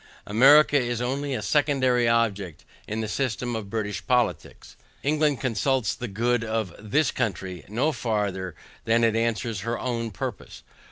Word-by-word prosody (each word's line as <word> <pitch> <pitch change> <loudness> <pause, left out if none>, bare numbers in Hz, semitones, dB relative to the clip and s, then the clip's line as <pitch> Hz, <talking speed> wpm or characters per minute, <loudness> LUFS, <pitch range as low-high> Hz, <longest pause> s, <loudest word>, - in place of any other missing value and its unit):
America 145 +7 +6
is 120 -2 -2
only 135 +3 -2
a 105 - -4
secondary 130 -4 +2
object 100 -8 0 0.2
in 110 +1 -3
the 110 - -3
system 120 0 -2
of 105 -3 -5
British 105 -2 -3
politics, 125 -2 -1 0.3
England 150 -2 +1
consults 130 0 0
the 125 - -5
good 120 +3 0
of 110 -5 -2
THIS 125 +8 +1
country, 95 -4 -3
no 125 +10 0
farther 100 - -2 0.3
than 115 +1 +3
it 115 -1 +3
answers 115 -1 -1
her 115 +4 -2
OWN 115 -2 -2
purpose. 95 -6 -7
115 Hz, 150 wpm, -25 LUFS, 105-130 Hz, 0.3 s, America